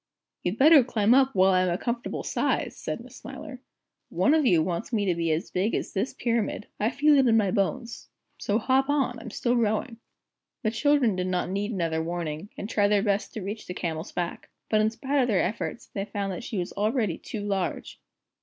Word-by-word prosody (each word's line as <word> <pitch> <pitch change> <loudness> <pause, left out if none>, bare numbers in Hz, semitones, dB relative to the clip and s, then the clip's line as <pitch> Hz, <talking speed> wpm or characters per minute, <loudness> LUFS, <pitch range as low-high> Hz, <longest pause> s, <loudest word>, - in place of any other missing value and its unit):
"You'd 180 +5 -2
better 295 0 +7
climb 225 -2 +2
up 270 -1 +4
while 190 0 +5
I'm 185 0 +3
a 175 - 0
comfortable 235 +2 -3
size," - - -1
said - - -5
Miss 255 +1 -13
Smiler. 270 -1 -9 0.5
"One 285 - +2
of 310 -4 +3
you 165 -7 +4
wants 175 - -3
me 210 -4 +1
to 185 - +2
be 165 -1 -1
as 155 +2 -2
big 195 +5 0
as - - -3
this 210 +6 -1
pyramid. 230 -3 -1
I 215 - +2
feel 295 +4 +4
it 265 - +4
in 225 -1 +5
my 200 -4 +2
bones. 205 +5 -2 0.3
So 205 - 0
hop 265 +4 +2
on, 265 -5 +1
I'm - - -8
still 240 - 0
growing!" 230 0 0 0.7
The 215 - +1
children 265 -3 +2
did 180 0 -2
not 180 0 -1
need 205 +3 -2
another 165 -5 -1
warning, 165 +1 -4
and 200 - -4
tried 205 -2 +2
their 205 -1 +2
best 200 -1 -1
to 215 - -4
reach 205 +3 -6
the 180 - -5
Camel's 160 -1 -4
back. 175 -1 -4 0.2
But 215 -1 +4
in 215 - +3
spite 270 +5 -1
of 245 - +2
their 205 -6 +2
efforts, 215 +4 -3
they 195 -1 -5
found 200 -2 -3
that 180 - -6
she 230 - -5
was 175 -1 -3
already 210 -3 0
too 215 - -6
large. 195 -3 -3
215 Hz, 215 wpm, -26 LUFS, 185-245 Hz, 0.7 s, better